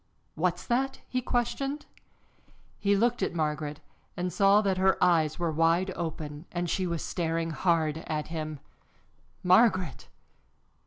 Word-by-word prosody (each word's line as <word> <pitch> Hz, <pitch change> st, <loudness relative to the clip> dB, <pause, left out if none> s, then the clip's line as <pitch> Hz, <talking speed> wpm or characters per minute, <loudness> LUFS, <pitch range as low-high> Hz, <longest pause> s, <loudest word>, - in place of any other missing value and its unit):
"What's 175 Hz, +2 st, -1 dB
that?" 265 Hz, +3 st, 0 dB
he 255 Hz, -, -1 dB
questioned. 265 Hz, +4 st, -1 dB, 0.9 s
He 200 Hz, 0 st, +2 dB
looked 235 Hz, +3 st, +1 dB
at 190 Hz, -, -1 dB
Margaret 150 Hz, -2 st, -2 dB, 0.4 s
and 180 Hz, 0 st, -2 dB
saw 200 Hz, +1 st, +5 dB
that 195 Hz, -3 st, 0 dB
her 190 Hz, 0 st, +3 dB
eyes 160 Hz, -4 st, +3 dB
were 170 Hz, -2 st, -1 dB
wide 165 Hz, +4 st, +2 dB
open 155 Hz, -2 st, -5 dB
and 175 Hz, 0 st, -2 dB
she 185 Hz, +2 st, 0 dB
was 170 Hz, -2 st, -2 dB
staring 165 Hz, -1 st, -2 dB
hard 160 Hz, -1 st, +1 dB
at 155 Hz, -1 st, -3 dB
him. 155 Hz, -2 st, -4 dB, 0.8 s
"Margaret!" 185 Hz, -1 st, +3 dB
175 Hz, 135 wpm, -28 LUFS, 160-195 Hz, 0.9 s, saw